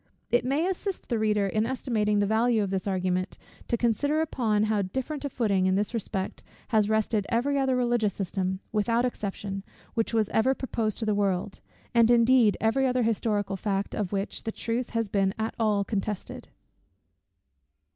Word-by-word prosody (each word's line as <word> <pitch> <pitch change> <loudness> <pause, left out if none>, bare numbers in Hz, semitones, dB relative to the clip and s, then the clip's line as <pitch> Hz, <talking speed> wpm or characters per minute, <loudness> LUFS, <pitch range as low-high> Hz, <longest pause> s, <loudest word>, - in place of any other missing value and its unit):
It 240 +1 +3
may 280 +6 +1
assist 380 +1 -4
the 235 -3 0
reader 210 -2 +2
in 215 +3 0
estimating 220 -5 0
the 205 - +3
value 220 +1 +2
of 195 - -3
this 190 0 -2
argument, 185 -1 -1 0.3
to 235 - +1
consider 250 +7 +1
upon 225 -9 +1
how 215 -1 +1
different 265 +10 -4
a - - -1
footing, 200 -7 +1
in 185 - +2
this 205 +4 0
respect, 195 -4 -3 0.3
has 215 -2 +3
rested 220 -1 +1
every 275 +4 +1
other 265 -1 +2
religious 240 -4 +1
system, 190 0 -2
without 230 +3 +1
exception, 200 -4 -4 0.3
which 225 -1 0
was 220 -3 +2
ever 260 +5 +2
proposed 225 -5 -2
to 225 - -3
the 215 - +2
world; 195 -1 -1 0.3
and, 235 -1 +5
indeed, 240 -2 +5
every 265 +4 +2
other 250 -1 +1
historical 210 -3 0
fact, 195 0 -2
of 200 -4 -2
which 200 0 -3
the 225 - -3
truth 235 +2 -3
has 230 -2 -1
been 195 -1 +1
at 220 0 -2
all 210 -3 +2
contested. 205 -1 -4
220 Hz, 175 wpm, -27 LUFS, 200-240 Hz, 0.3 s, and